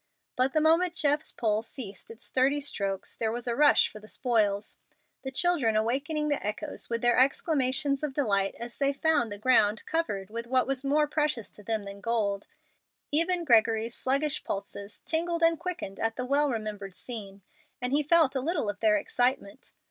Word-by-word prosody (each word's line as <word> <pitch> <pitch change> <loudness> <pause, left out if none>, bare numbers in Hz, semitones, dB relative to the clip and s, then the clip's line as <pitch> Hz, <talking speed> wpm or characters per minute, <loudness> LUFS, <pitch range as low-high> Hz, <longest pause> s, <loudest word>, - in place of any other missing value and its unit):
But 255 +1 +2
the 310 - +2
moment 330 +3 +3
Jeff's 295 -1 +1
pole 215 -2 0
ceased 220 -4 -6
its 230 +2 -10
sturdy 270 +3 +1
strokes 200 -9 -3
there 225 -1 -1
was 240 +1 -5
a 235 - 0
rush 290 +2 +5
for 215 - -11
the 215 - -15
spoils, 215 -5 0 0.4
the 265 - -4
children 270 -7 +2
awakening 280 +8 0
the 290 -1 -1
echoes 215 +9 -3
with 230 0 -2
their 240 +1 +4
exclamations 275 - +2
of 295 -3 -4
delight 200 -8 +1
as 235 +1 -8
they 280 0 +1
found 275 -6 +1
the 205 - -5
ground 215 -2 +3
covered 210 - -2
with 230 +1 -5
what 255 0 +2
was 270 0 -2
more 295 +2 +2
precious 295 -6 -1
to - - -11
them 220 0 -2
than 200 0 -10
gold. 205 -3 -1 0.6
Even 340 +4 +2
Gregory's 225 -2 +3
sluggish 280 +4 +1
pulses 200 +1 -6
tingled 335 +1 -1
and 330 -1 +3
quickened 345 - -5
at 225 0 -1
the 250 - -4
well 285 +2 +2
remembered 210 -5 -5
scene, 200 -5 -8 0.4
and 250 +2 -3
he 295 - +3
felt 310 -2 +4
a 265 - 0
little 295 - -1
of - - -17
their 320 -1 +3
excitement. 250 -5 -1
255 Hz, 185 wpm, -28 LUFS, 215-300 Hz, 0.6 s, rush